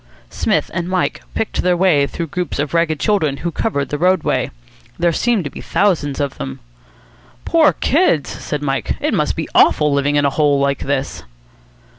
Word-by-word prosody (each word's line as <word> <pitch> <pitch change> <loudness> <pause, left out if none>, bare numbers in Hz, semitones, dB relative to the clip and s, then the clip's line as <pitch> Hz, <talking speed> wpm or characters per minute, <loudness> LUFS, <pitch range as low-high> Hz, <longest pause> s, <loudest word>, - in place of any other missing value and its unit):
Psmith - - 0
and 170 +1 -3
Mike 185 -1 -1
picked 225 - -1
their 180 -1 +2
way 165 -6 +3
through 170 - -4
the 155 - -17
groups 180 -1 -3
of 145 +1 -2
ragged 165 -3 +1
children 160 -10 +1
who 170 - -3
covered 140 -8 -2
the 145 - -3
roadway. 185 +2 +1 0.5
There 170 0 +1
seemed 235 +1 +1
to 145 - -5
be - - -9
thousands 160 -9 0
of 140 -2 -3
them. 65 0 -5 0.9
"Poor 325 -2 +4
kids!" 285 - +1
said 150 -1 -5
Mike. 135 -2 -1
"It - - -1
must - - 0
be - - -3
awful 150 -1 +4
living 140 +1 +1
in 145 0 +3
a 140 - +2
hole 145 -2 +2
like 140 0 0
this." 140 -1 -2
150 Hz, 185 wpm, -18 LUFS, 140-180 Hz, 0.9 s, Poor